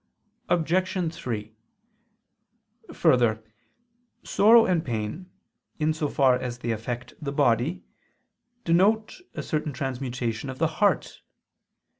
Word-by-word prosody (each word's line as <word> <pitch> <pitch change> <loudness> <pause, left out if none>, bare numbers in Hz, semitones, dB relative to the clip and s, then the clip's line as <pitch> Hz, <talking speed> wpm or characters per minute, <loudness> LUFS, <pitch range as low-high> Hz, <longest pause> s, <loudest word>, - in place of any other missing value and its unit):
Obj. 175 +1 0
3: 110 -8 -5 1.4
Further, 115 -3 +2 0.8
sorrow 225 +3 +6
and 170 -3 +1
pain, 120 - -4 0.5
in 155 0 +1
so 155 -1 -2
far 135 -2 +3
as 120 -1 -5
they 120 -1 -3
affect 120 +2 -5
the 140 -2 -3
body, 140 +4 +1 0.8
denote 210 - +2
a - - -4
certain 150 -1 -2
transmutation 130 -3 -3
of 130 - -6
the 160 - +2 0.2
heart. 205 - +1
140 Hz, 105 wpm, -26 LUFS, 120-175 Hz, 1.4 s, sorrow